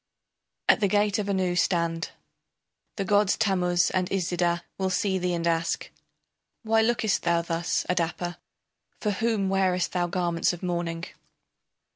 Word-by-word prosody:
] - - -58
At - - +5
the 205 - +3
gate 205 +2 +2
of 205 -1 -2
Anu 185 -2 +1
stand. 170 -2 0 0.9
The 195 - -2
gods 205 0 +3
Tammuz 180 -4 +2
and 185 -1 0
Iszida 175 -2 0 0.2
will 190 0 +1
see 190 0 0
thee 180 -1 0
and 170 0 -2
ask: 165 0 0 0.7
Why 225 0 +3
lookest 220 -2 +1
thou 170 -1 +1
thus, 170 0 -1
Adapa, 175 0 -1 0.6
For 210 - 0
whom 215 -1 0
wearest 190 -2 +1
thou 175 -1 0
garments 175 -1 0
of 175 - -9
mourning? 170 -2 -2
180 Hz, 145 wpm, -26 LUFS, 170-200 Hz, 0.9 s, At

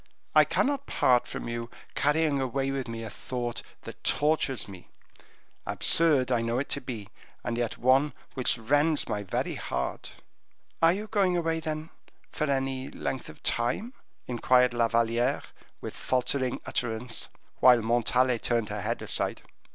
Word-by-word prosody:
"I - - +7
cannot 280 0 0
part 125 -1 +3
from - - -6
you, 115 0 -4 0.2
carrying 145 -1 +2
away 135 +1 -1
with 135 -2 -3
me 115 0 -5
a 110 - -5
thought 120 -2 -4 0.2
that - - -10
tortures 145 -5 +1
me; 95 -3 -12 0.7
absurd 145 -6 +4
I 120 -2 +2
know 115 +1 -1
it 140 - -2
to 140 - -1
be, 115 -6 -6 0.3
and 120 -1 -2
yet 120 -1 -2
one 130 +3 +3 0.2
which 130 -1 +1
rends 145 +7 +2
my 105 -2 -2
very 100 - -2
heart." - - -4 0.7
"Are 165 0 +7
you 205 +4 -3
going 195 -5 +2
away, 165 -1 0
then, 155 0 -4 0.4
for 155 -2 -1
any 135 -1 -1
length 130 - -4
of - - -13
time?" 130 - -1 0.3
inquired 125 +1 +3
La 120 -1 +2
Valliere, 115 +3 +1 0.4
with - - -6
faltering 130 0 0
utterance, 115 0 -3 0.3
while 125 -3 +6
Montalais 120 +2 +2
turned 115 -3 0
her 105 0 -4
head - - -2
aside. - - +1
130 Hz, 150 wpm, -28 LUFS, 115-145 Hz, 0.7 s, I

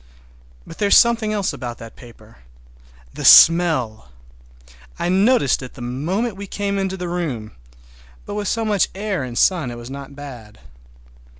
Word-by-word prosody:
But 165 - -13
there 205 - +1
is - - +6
something 230 -2 +3
else 205 -3 -1
about 120 -2 -7
that 115 -1 -12
paper—the - - -16
smell! 155 - +5 0.9
I 175 - -2
noticed 195 - +2
it 130 - -10
the - - -11
moment 175 - -3
we 200 +1 -8
came 200 0 -3
into 190 0 -3
the 180 -1 -5
room, 150 -12 -4 0.7
but - - -7
with 205 -1 -3
so 225 +2 -1
much 205 -3 +1
air 200 -3 -3
and 120 -2 -7
sun 170 -9 +2
it 120 - -8
was 120 +2 -10
not 140 0 -9
bad. 125 -7 -11
155 Hz, 160 wpm, -20 LUFS, 120-200 Hz, 0.9 s, is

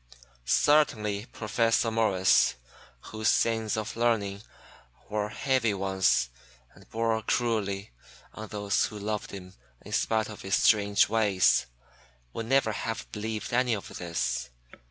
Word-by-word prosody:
Certainly 110 - +2
Professor 115 +1 0
Morris, 100 -5 +3 0.6
whose 110 0 -2
sins 110 0 +1
of 110 0 -4
learning 110 -4 0 0.7
were 105 0 -2
heavy 115 -2 0
ones 95 -9 +1 0.4
and - - -19
bore 115 0 0
cruelly 105 -4 -1 0.4
on 110 0 -8
those 100 -1 0
who 110 - -7
loved 105 +1 -3
him 90 -1 -9 0.3
in - - -10
spite 110 -1 +1
of 110 - -9
his 95 -1 0
strange 100 -2 +4
ways, 105 -4 +3 0.7
would 115 - -5
never 135 -3 +3
have 115 +1 -5
believed 110 +1 -4
any 125 -1 +2
of 100 - -9
this. 85 -6 -2
110 Hz, 125 wpm, -28 LUFS, 100-115 Hz, 0.7 s, strange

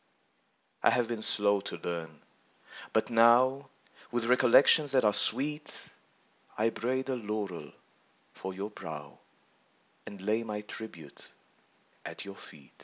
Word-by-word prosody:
I - - +6
have 120 -2 +1
been 115 -2 -4
slow 100 -2 +4
to 100 - -6
learn, 80 -3 -6 0.7
but 110 - 0
now, 125 +4 +4 0.4
With 120 -1 -1
recollections 130 +4 +5
■ - - -1
that 130 -4 +3
are 105 - +4
sweet, 150 +5 -3 0.9
I 110 +2 +2
braid 130 +4 -2
a 130 - 0
laurel 105 -9 -5 0.6
for 95 - -7
your 100 +3 -6
brow 75 -7 -9 0.9
And 100 - -9
lay 105 +4 -1
my 105 -2 -5
tribute 95 -8 -10 0.7
at - - -8
your 100 0 -10
eet. 70 -3 -18
110 Hz, 130 wpm, -30 LUFS, 95-125 Hz, 0.9 s, I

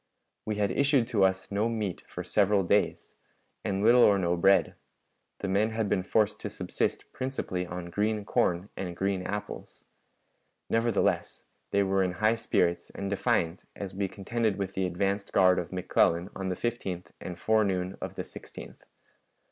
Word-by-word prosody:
We 105 - -1
had 100 -2 +1
had - - -3
issued 140 -3 +4
to 105 -6 +2
us 95 +1 +1
no 105 +3 +1
meat 105 -5 -3
for - - -6
several 100 -1 +2
days, 85 - 0 0.4
and 100 0 -1
little 120 +3 +6
or 100 -4 +6
no 90 -2 +1
bread; 95 +3 +4 0.7
the - - -2
men 100 +3 +2
had 110 -1 -1
been 95 - +2
forced 105 +3 +1
to - - -4
subsist - - -3
principally 110 -9 -3
on 85 0 -6
green 105 +2 0
corn 90 0 +1
and 90 -3 -5
green 95 -1 0
apples. 105 +2 -6 0.9
Nevertheless, 115 -2 +1 0.2
they 100 0 +2
were 95 0 +1
in 90 -1 -1
high 110 +5 +3
spirits 90 -6 0
and 100 0 -5
defiant 100 -5 0
as 100 -2 -6
we 100 0 -1
contended 110 +2 -1
with 100 -1 -3
the 95 -1 0
advanced 100 +3 -1
guard 90 -1 +5
of 85 - -5
McClellan 90 0 +1
on 95 -1 -3
the 90 - -1
15th 95 -6 -4
and 90 -2 -6
forenoon 95 -3 +1
of - - -5
the - - -3
16th. - - -10
100 Hz, 170 wpm, -29 LUFS, 90-110 Hz, 0.9 s, little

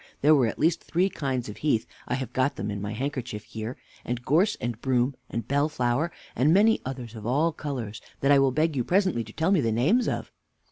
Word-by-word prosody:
There 150 +2 +6
were 135 -6 +4
at - - -4
least 165 +2 +1
three 180 +3 +1
kinds 130 -4 -2
of 105 - -8
heath 145 -7 +1 0.2
(I 125 - 0
have 130 -3 -5
got 130 +2 +1
them 100 +2 -3
In 100 -1 -4
my 105 +1 -3
handkerchief 125 -3 -4
here), 110 +2 -6 0.3
and 120 0 -4
gorse, 180 +9 +3
and 120 -1 -4
broom, 130 0 +1 0.2
and 115 -1 -4
bellflower, 145 +1 +1 0.2
and 135 +6 +3
many 210 +5 +5
others 125 -3 -6
of 110 -1 -7
all 150 +7 +2
colors, 125 -9 -5 0.2
that 140 - +3
I 140 - +7
will 135 -1 +4
beg 155 +4 +1
you 125 - +1
presently 185 - +2
to 110 - -12
tell 160 - 0
me 190 -6 +4
the 115 -3 +1
names 155 - +2
of. - - -3
130 Hz, 225 wpm, -26 LUFS, 115-155 Hz, 0.3 s, I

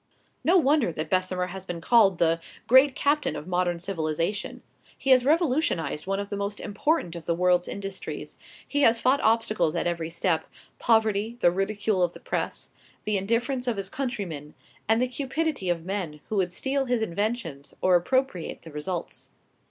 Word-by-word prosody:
No 360 +3 +5
wonder 290 - +3
that 155 0 -5
Bessemer 185 -1 +1
has 190 0 -7
been 175 -3 -5
called 200 -1 +4
the 165 0 +2 0.3
"great 260 +3 +6
captain 295 +1 +1
of 150 - -6
modern 180 -1 0
civilization." 170 +2 -3 0.3
He 270 - 0
has 255 -1 +7
revolutionized 275 - +1
one 195 0 0
of 200 0 -4
the 205 - -3
most 200 +1 -3
important 205 - -1
of 170 - -9
the 170 - +1
world's 180 0 +2
industries; 195 -1 -6 0.3
he 290 - 0
has 230 -3 +5
fought 265 +4 +3
obstacles 215 -7 +2
at - - 0
every 170 -2 -2
step, 170 0 0 0.3
poverty, 220 0 +2
the 175 - +5
ridicule 195 +1 0
of 175 -1 +2
the - - -11
press, - - -4 0.3
the 210 - 0
indifference 240 +6 0
of 235 -4 0
his 195 -1 -3
countrymen, 195 - -4 0.3
and 225 +1 +4
the 250 - +2
cupidity 275 - -2
of 170 -1 -1
men 180 -6 -3
who 215 - -1
would 180 -2 +1
steal 270 +8 -1
his 245 -3 0
inventions 195 - -3
or 185 -1 +4
appropriate 185 0 0
the 165 - -11
results. 160 +4 -5
200 Hz, 175 wpm, -26 LUFS, 175-245 Hz, 0.3 s, has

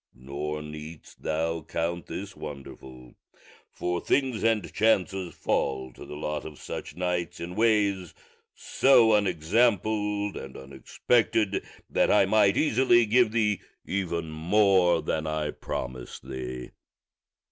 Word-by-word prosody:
Nor 75 +4 -5
needst 75 0 -10
thou 80 +1 -1
count 85 +3 -3
this 100 +1 -6
wonderful, 65 -4 -10 0.6
for 90 0 -2
things 130 -5 +1
and 110 -4 +1
chances 95 -4 +1
fall 65 -2 -1
to - - -11
the - - -8
lot 75 0 -3
of 75 -2 -9
such 75 - -7
knights 90 0 -2
in 85 +1 -6
ways 100 -4 +1 0.4
so 125 -5 +4
unexampled 105 +2 +1
and 70 - -8
unexpected 100 - 0 0.2
that - - +2
I 105 - +5
might 100 -1 +3
easily 125 -4 +4
give 115 +1 +3
thee 105 -3 +1 0.2
even 85 -4 -2
more 90 +1 +3
than 80 0 -2
I 75 -1 -1
promise 65 -1 -6
thee." 65 -1 -7
90 Hz, 120 wpm, -27 LUFS, 75-105 Hz, 0.6 s, I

